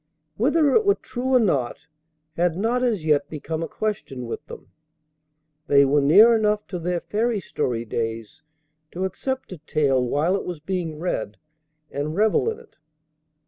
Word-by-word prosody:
Whether 290 - +3
it 440 - +4
were 400 0 +4
true 260 +1 -2
or - - +7
not 140 - +1 0.6
had 175 -1 +1
not 230 +5 0
as 220 -10 0
yet 150 -2 +2
become 160 +1 -5
a 165 - -2
question 175 - -4
with 115 - -6
them. - - -11 1.0
They 140 -2 +6
were 145 +2 +3
near 210 +12 +7
enough 210 -1 +1
to 180 - -4
their 175 0 -2
fairy 225 +1 -1
story 120 -10 -3
days 115 -1 -4 0.5
to 185 +2 -2
accept 260 +8 -4
a 185 - -8
tale 140 -4 +1
while 150 +9 +1
it 200 - -2
was 175 -3 -5
being 165 -1 -3
read, 130 - -3 0.5
and 145 +3 -3
revel 215 - +2
in 445 - -4
it. 465 - -19
175 Hz, 165 wpm, -23 LUFS, 145-220 Hz, 1.0 s, or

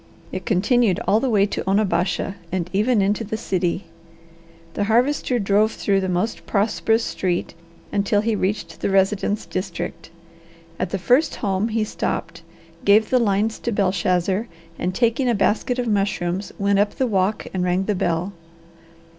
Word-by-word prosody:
It - - -6
continued 215 -1 +2
all 210 - +4
the 265 - 0
way 205 -3 +4
to 210 - -3
Onabasha 195 -2 +1 0.2
and 180 -1 -2
even 210 +1 +2
into 205 +3 0
the 220 +1 -4
city. 185 -2 -1 0.9
The 205 - -1
Harvester 250 +3 +2
drove 210 +1 +2
through 195 -1 +1
the 190 - -2
most 180 +6 -2
prosperous 225 +2 +1
street 180 -2 -2 0.4
until 205 0 +1
he 220 0 0
reached 200 +1 -2
the - - 0
residence 195 +2 +1
district. 185 -3 -5 0.7
At - - -1
the 195 - -2
first 250 - +2
home 195 +1 -1
he 225 -1 0
stopped, 215 - -3 0.4
gave 210 +2 +4
the 255 - +4
lines 215 0 +1
to 235 - -2
Belshazzar, 185 +1 +1 0.3
and, 180 +1 -2
taking 245 +3 +2
a 235 - +2
basket 220 +5 +1
of 250 - -1
mushrooms, 195 -2 -1
went 200 0 +2
up 205 0 +1
the 260 - +1
walk 200 -2 0
and 185 -1 -1
rang 180 +1 +1
the 210 - +1
bell. 180 +1 -1
200 Hz, 160 wpm, -22 LUFS, 190-220 Hz, 0.9 s, all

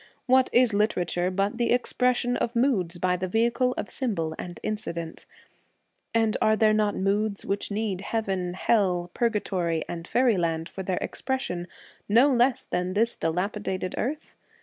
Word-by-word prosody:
What 260 0 +4
is 245 -3 +4
literature 180 -4 +1
but 200 +4 -1
the 235 - +1
expression 245 0 +1
of 240 0 -2
moods 210 -9 +1
by 180 +1 +1
the 185 +1 -3
vehicle 235 +5 +1
6 - - +1
of - - -11
symbol 180 -11 -1
and 175 -1 -7
incident? 170 -6 -5 0.8
And 225 -1 +2
are 215 - +4
there 215 -1 +4
A - - +2
Teller 215 -1 +2
not - - -7
moods 200 +1 0
which 200 +1 -2
need 205 -3 -2
heaven, 195 -5 -2
hell, 180 -5 +1
purga 230 -3 0
tory, 170 -4 -1
and 170 0 -6
faeryland 175 -10 +1
for 195 - -7
their 185 -1 -2
expression, 180 -10 -3 0.4
no 240 +7 +6
less 245 +1 +2
than 180 +1 -2
this 230 +3 +2
dilapidated 185 +2 -2
earth 295 +6 -4
205 Hz, 165 wpm, -26 LUFS, 180-235 Hz, 0.8 s, no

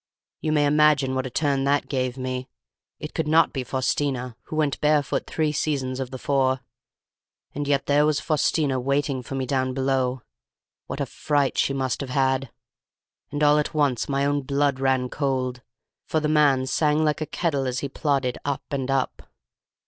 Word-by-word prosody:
You 155 - -1
may 150 -1 +3
imagine 145 -2 +4
what 130 0 -1
a - - -6
turn 140 +1 0
that 140 +1 +1
gave 130 -2 -2
me! 130 0 -4 0.5
It 150 - -7
could 160 -2 -1
not 160 0 +4
be 135 - -2
Faustina, 130 -1 -1
who - - -6
went 150 -3 0
barefoot 150 -1 +1
three 155 -2 0
seasons 135 -4 -1
of 130 -2 -3
the 130 - -6
four, 130 -1 +1 0.9
and 145 0 -3
yet 140 -1 +1
there 145 +1 +4
was 150 -1 +2
Faustina 150 -3 +1
waiting 140 +1 0
for 130 +2 -7
me 135 -1 -1
down 130 -1 -1
below. 130 -2 0 0.6
What - - -4
a - - +1
fright 145 -2 0
she 135 - +1
must 130 0 -1
have 135 - -5
had! 130 0 +1 0.8
And 145 +1 -1
all 150 0 +5
at 150 - -3
once 140 -6 +1
my 140 0 +1
own 145 0 +1
blood 140 0 0
ran 130 -1 +1
cold: 130 -2 -2 0.5
for 160 - +1
the 155 - -1
man 145 -4 +3
sang 150 +3 +2
like 150 0 0
a 155 - -2
kettle 145 -6 -1
as 125 0 -2
he 140 - -2
plodded 135 -3 -1
up 140 -2 -2
and 135 -2 -2
up. 135 -1 -1
140 Hz, 185 wpm, -24 LUFS, 130-150 Hz, 0.9 s, all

